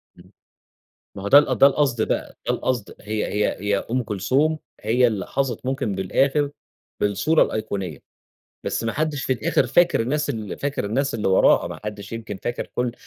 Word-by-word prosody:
إمم. -, -, -18 dB, 0.8 s
ما 100 Hz, -, -8 dB
هو 100 Hz, -, -2 dB
ده 140 Hz, -, +9 dB
ده 135 Hz, -3 st, +4 dB
القصد 135 Hz, -5 st, +1 dB
بقى، -, -, -1 dB, 0.2 s
ده -, -, +3 dB
القصد، 125 Hz, -5 st, -2 dB
هي 105 Hz, +1 st, -2 dB
هي 105 Hz, 0 st, 0 dB
هي 105 Hz, 0 st, +1 dB
أم 125 Hz, +1 st, +1 dB
كلثوم 135 Hz, -, +1 dB, 0.2 s
هي 120 Hz, +4 st, +3 dB
اللي 105 Hz, -5 st, -2 dB
حظت 130 Hz, -3 st, -2 dB
ممكن 130 Hz, -6 st, -1 dB
بالآخر 135 Hz, +10 st, +1 dB, 0.5 s
بالصورة 105 Hz, +11 st, +3 dB
الأيقونية. 100 Hz, -8 st, -3 dB, 0.7 s
بس -, -, -2 dB
ما 115 Hz, -, -1 dB
حدش 155 Hz, -2 st, -1 dB
في 130 Hz, -, +1 dB
الآخر 125 Hz, -, +1 dB
فاكر 170 Hz, +6 st, +3 dB
الناس 145 Hz, +6 st, 0 dB
ال 110 Hz, -4 st, -5 dB
فاكر 140 Hz, -5 st, -2 dB
الناس 135 Hz, +6 st, -1 dB
اللي 105 Hz, -3 st, 0 dB
وراها، 95 Hz, -, +4 dB
ما -, -, -8 dB
حدش 105 Hz, 0 st, -6 dB
يمكن 110 Hz, -3 st, -5 dB
فاكر 120 Hz, -, -3 dB
كل 125 Hz, -1 st, 0 dB
120 Hz, 175 wpm, -23 LUFS, 105-140 Hz, 0.8 s, ده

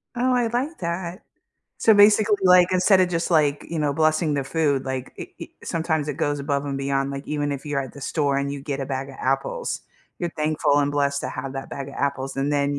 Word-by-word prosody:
Oh, 250 Hz, +1 st, +2 dB
I 245 Hz, -2 st, +2 dB
like 255 Hz, +8 st, -2 dB
that. 170 Hz, +2 st, -4 dB, 0.5 s
So 225 Hz, -, +5 dB
basically, 210 Hz, 0 st, +6 dB
like, 180 Hz, -1 st, +7 dB
instead 185 Hz, +1 st, +4 dB
of 185 Hz, -, +3 dB
just, 170 Hz, 0 st, -1 dB
like, 150 Hz, -3 st, +2 dB
you 165 Hz, -, -3 dB
know, 150 Hz, -2 st, +1 dB
blessing 155 Hz, +1 st, +2 dB
the 140 Hz, -1 st, -1 dB
food, 145 Hz, -1 st, 0 dB
like, 130 Hz, -1 st, -4 dB
it -, -, -8 dB
it -, -, -8 dB
sometimes 160 Hz, -3 st, -1 dB
it 145 Hz, -, -2 dB
goes 145 Hz, -2 st, 0 dB
above 140 Hz, 0 st, -1 dB
and 140 Hz, -1 st, -3 dB
beyond, 135 Hz, 0 st, -1 dB
like, 140 Hz, 0 st, -6 dB
even 145 Hz, -1 st, -1 dB
if 140 Hz, +1 st, -6 dB
you're 145 Hz, -2 st, -1 dB
at 130 Hz, -, -6 dB
the 140 Hz, -, -11 dB
store 140 Hz, -1 st, 0 dB
and 140 Hz, 0 st, -2 dB
you 140 Hz, 0 st, -5 dB
get 140 Hz, -1 st, -3 dB
a 135 Hz, -, -3 dB
bag 135 Hz, 0 st, -4 dB
of 135 Hz, -, -12 dB
apples, 470 Hz, -, -1 dB, 0.4 s
you're 175 Hz, -1 st, -2 dB
thankful 150 Hz, -1 st, +1 dB
and 145 Hz, 0 st, +2 dB
blessed 140 Hz, -1 st, 0 dB
to -, -, -3 dB
have 130 Hz, 0 st, -5 dB
that 135 Hz, 0 st, -6 dB
bag 140 Hz, 0 st, -6 dB
of 140 Hz, -, -10 dB
apples, 135 Hz, -1 st, -2 dB
and 135 Hz, +1 st, 0 dB
then 140 Hz, 0 st, +1 dB
145 Hz, 240 wpm, -23 LUFS, 140-170 Hz, 0.5 s, like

